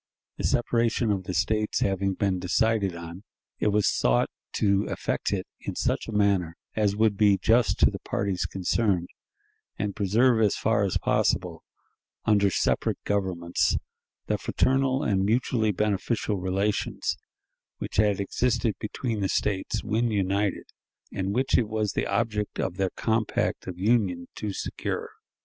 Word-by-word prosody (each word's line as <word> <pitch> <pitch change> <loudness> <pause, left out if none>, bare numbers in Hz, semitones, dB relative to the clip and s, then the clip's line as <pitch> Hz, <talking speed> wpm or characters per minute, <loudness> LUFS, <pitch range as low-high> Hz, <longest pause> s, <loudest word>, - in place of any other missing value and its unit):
The - - -5
separation 115 -1 +1
of 95 -2 -2
the 90 - -4
States 105 +5 0
having 95 0 0
been 95 -2 0
decided 100 +1 +1
on, 85 +2 -8 0.4
it - - +1
was 105 -1 +2
sought - - +2 0.2
to 100 -1 +2
effect - - -2
it 95 -2 -1
in - - -5
such - - -1
manner 100 -6 +1 0.2
as 105 -2 +1
would 110 -1 +3
be 100 -2 +4
just 115 +4 +3
to - - +6
the - - -6
parties 100 -2 -2
concerned, 95 -1 0 0.7
and 105 -2 -2
preserve 110 +4 +3
as 105 -2 +3
far 110 -1 +1
as 95 - 0
possible, - - 0 0.6
under 100 -2 +4
separate - - 0
governments, 95 -4 0 0.5
the - - -1
fraternal 135 +1 +1
and 95 -2 +1
mutually 110 0 +1
beneficial 105 +1 -1
relations 95 +3 -1 0.6
which - - -6
had 105 -1 +3
existed 115 +2 0
between 110 +1 -3
the 95 -1 0
States 105 +2 -1
when 115 +2 0
united, 100 -1 0 0.5
and 95 +1 -2
which 130 +1 +3
it 115 - 0
was 110 -2 -1
the - - -1
object 105 0 -1
of 95 0 -2
their 95 -1 +1
compact 110 -1 -1
of 90 -2 -5
union 95 -4 +1
to 105 -2 -4
secure. - - -4
105 Hz, 145 wpm, -26 LUFS, 95-110 Hz, 0.7 s, to